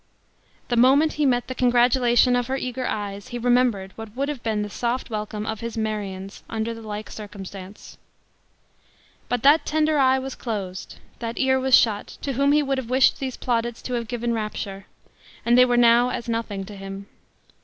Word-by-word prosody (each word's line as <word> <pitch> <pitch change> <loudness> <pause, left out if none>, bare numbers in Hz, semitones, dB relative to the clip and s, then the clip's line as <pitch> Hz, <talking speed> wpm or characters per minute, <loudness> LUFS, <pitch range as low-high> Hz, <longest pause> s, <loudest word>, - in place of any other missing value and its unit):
The 240 - +1
moment 270 +6 +5
he 295 -2 +1
met 245 -2 +1
the 255 - -4
congratulation 245 0 +3
of 245 -1 0
her 265 +1 -1
eager 255 -1 -3
eyes, 205 -1 -4
he 240 - -5
remembered 240 -5 +1
what 225 -1 -9
would 275 +2 -1
have 285 -5 -4
been 215 -2 -1
the - - -4
soft 240 +2 -2
welcome 210 0 -4
of 220 -1 -3
his 230 0 -5
Marion's 200 -3 -4
under 225 +1 -2
the 225 - -10
like 210 -1 -6
circumstance! 200 -2 -10 1.3
But 245 -2 -1
that 290 +4 +6
tender 310 -1 +1
eye 260 -1 +4
was 265 0 -4
closed 195 -6 -5 0.2
that 230 0 -5
ear 265 0 +2
was 260 -1 +6
shut, 215 -3 0
to 275 - -2
whom 280 +3 +2
he 300 0 +4
would 270 -1 -1
have 240 -3 -7
wished 260 +3 +4
these 265 -3 -4
plaudits 235 -1 -2
to 250 - -4
have 235 -2 -2
given 240 -1 -2
rapture 205 -3 -4 0.6
and 235 +1 +4
they 250 0 +7
were 245 -1 +1
now 240 +1 +5
as 235 - -4
nothing 225 -4 -3
to 205 +1 -10
him. 195 0 -8
235 Hz, 190 wpm, -24 LUFS, 210-255 Hz, 1.3 s, they